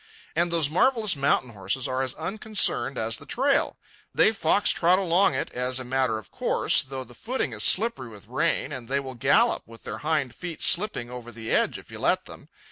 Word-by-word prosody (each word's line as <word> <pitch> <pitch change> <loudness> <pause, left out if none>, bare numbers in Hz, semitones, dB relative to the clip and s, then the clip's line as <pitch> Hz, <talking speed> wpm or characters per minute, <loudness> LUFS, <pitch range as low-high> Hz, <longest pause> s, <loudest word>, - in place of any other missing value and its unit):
And 170 +1 +2
those 165 -4 +2
marvellous 215 - +2
mountain 135 -3 +1
horses 105 +5 -3
are 130 +1 -1
as 130 -1 -3
unconcerned 185 - -1
as 110 0 -1
the - - -13
trail. 275 +2 +1 0.4
They - - +5
fox 205 -1 +2
trot 180 +2 +3
along 190 -3 +3
it 130 - -3
as 125 +1 -1
a - - -4
matter 130 -2 0
of 110 - -11
course, - - +2
though 130 0 -6
the 125 - -15
footing 225 - -3
is 105 -1 -1
slippery 185 - +3
with 105 -2 -13
rain, 130 +3 0
and 130 -5 -7
they 135 +2 +1
will 135 -1 -6
gallop 120 - +3
with 115 0 -13
their - - -6
hind 150 -5 0
feet 175 -2 -7
slipping 170 - +1
over 120 -1 -8
the 115 0 -7
edge - - +1
if - - -14
you - - -8
let - - +1
them. - - -12
135 Hz, 210 wpm, -25 LUFS, 120-175 Hz, 0.4 s, They